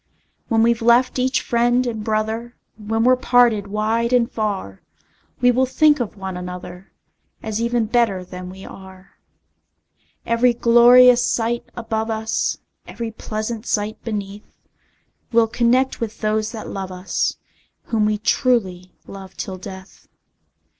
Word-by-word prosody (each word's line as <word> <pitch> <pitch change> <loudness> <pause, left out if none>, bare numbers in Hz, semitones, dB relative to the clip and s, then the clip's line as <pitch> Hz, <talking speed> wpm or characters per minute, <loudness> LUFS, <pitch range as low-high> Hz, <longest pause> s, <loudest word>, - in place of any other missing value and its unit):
When 225 -1 +2
we've 235 0 +2
left 240 +3 +3
each 260 +1 +1
friend 240 +1 +1
and 225 -3 -4
brother, 220 +2 -2 0.2
When 225 +1 -2
we're 255 +1 +5
parted 240 -5 +3
wide 220 +3 -1
and 245 0 +2
far, 200 - -4 0.6
We 245 0 +5
will 260 +2 +1
think 300 +2 +3
of 225 -3 -4
one 190 -1 -6
another, 180 0 -8 0.5
As 220 0 -3
even 235 -1 0
better 215 -5 0
than 180 0 -8
we 190 +1 -11
are. 190 0 -14 1.1
Every 235 +1 +2
glorious 245 +1 +6
sight 235 +1 -1
above 225 -1 -3
us, 220 0 -1 0.3
Every 230 -1 -6
pleasant 220 +1 -5
sight 210 0 -2
beneath, 205 -2 -6 0.8
We'll 230 -1 +4
connect 245 +3 +1
with 225 -2 -5
those 215 0 0
that 220 -2 -7
love 190 -1 -5
us, 185 +1 -2 0.5
Whom 215 -2 0
we 210 0 0
truly 200 -6 0
love 190 -1 -11
till 190 -1 -5
death! 190 0 -11
225 Hz, 135 wpm, -20 LUFS, 200-240 Hz, 1.1 s, glorious